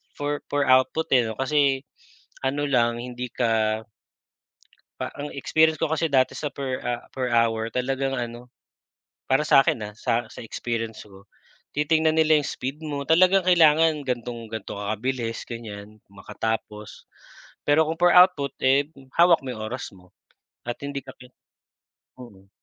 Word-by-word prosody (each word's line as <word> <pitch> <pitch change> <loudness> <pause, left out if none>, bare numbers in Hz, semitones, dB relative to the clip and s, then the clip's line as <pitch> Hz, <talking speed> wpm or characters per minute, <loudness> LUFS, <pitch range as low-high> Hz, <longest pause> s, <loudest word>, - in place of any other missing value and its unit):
for 145 0 -3
per 145 -1 +1
output, 130 +5 +3
eh, 125 - +5
'no, 110 +1 -7
kasi, 135 -1 +2 0.6
ano 140 +2 -1
lang 120 -3 +2
hindi 125 0 -6
ka 110 -3 +1 1.2
pa - - -4
ang 145 - -4
experience 160 +4 +2
ko 155 0 -2
kasi 160 +1 +1
dati 130 -3 +2
sa 150 - -2
per, 135 -2 -4
ah, 120 0 -3
per 130 -1 -3
hour 115 -1 +2
talagang 135 +3 -2
ano, 120 0 -6 0.8
para 135 +3 +3
sa'kin 135 -4 +4
ha, 105 - -6
sa 115 +1 0
sa - - -11
experience 115 -1 -4
ko, 100 0 -17 0.5
titingnan 155 +2 +2
nila 155 -1 +5
'yung 145 - -4
speed 135 +4 -5
mo. 145 -2 -4
Talagang 185 +3 +5
kailangan 160 -3 +4
gan'tong 120 -2 -4
gan'to 110 -3 -6
ka 100 - -5
kabilis, 115 0 -3
ganyan, 110 -2 -9
makatapos. 105 +1 -5 0.6
Pero 145 +2 +5
kung 160 +1 -3
per 175 0 +5
output, 180 -7 +5
eh, 135 +2 +3 0.3
hawak 170 -1 +6
mo 130 - -6
'yung 110 -3 -6
oras 125 +3 -6
mo. 90 -1 -20 0.6
At 120 - -4
hindi 140 0 -4
ka 135 - -11
ki 125 - -13 0.9
mm. 100 -6 -14
130 Hz, 155 wpm, -24 LUFS, 115-150 Hz, 1.2 s, hawak